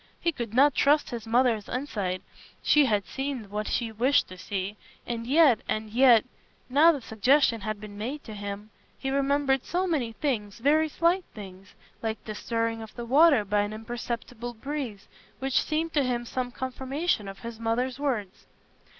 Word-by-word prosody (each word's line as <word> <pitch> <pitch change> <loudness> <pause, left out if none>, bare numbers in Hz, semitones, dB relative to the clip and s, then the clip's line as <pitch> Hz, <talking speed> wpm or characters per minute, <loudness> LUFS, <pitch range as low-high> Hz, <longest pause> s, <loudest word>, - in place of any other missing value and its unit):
He 340 - +1
could 235 -7 -6
not 280 +2 +6
trust 290 +3 +3
his 230 -2 -6
mother's 230 -3 +2
insight; 205 -9 -3 0.4
she 300 -1 +5
had 210 -6 +1
seen 265 -3 -4
what 210 +1 -3
she 230 -2 -1
wished 250 +6 +2
to 185 - -10
see. 195 +1 -4 0.3
And 230 -1 -4
yet—and 245 -7 +3
yet, 240 -1 +6 0.5
now 305 +5 +7
the 290 -5 -4
suggestion 230 +2 +2
had 215 +1 -3
been 205 -1 -9
made 265 +7 -4
to 220 - -9
him, 205 +1 -6 0.3
he 270 - -3
remembered 275 -1 +1
so 360 +2 -1
many 275 -10 -1
things, 220 -8 -2
very 305 +6 +3
slight 345 +4 +1
things, 190 -2 -11 0.3
like 220 -2 -4
the 215 - -5
stirring 230 +1 -2
of 220 -1 -10
the 240 - -5
water 280 -2 +5
by 205 +1 +1
an 205 +1 -1
imperceptible 235 +1 -5
breeze, 255 -5 -5 0.3
which 265 -1 +1
seemed 320 +1 -2
to 290 - +3
him 240 -2 -1
some 250 +1 -3
confirmation 260 - -2
of 195 0 -7
his 230 -1 -7
mother's 245 +3 -1
words. 230 -10 -3
240 Hz, 170 wpm, -27 LUFS, 215-280 Hz, 0.5 s, now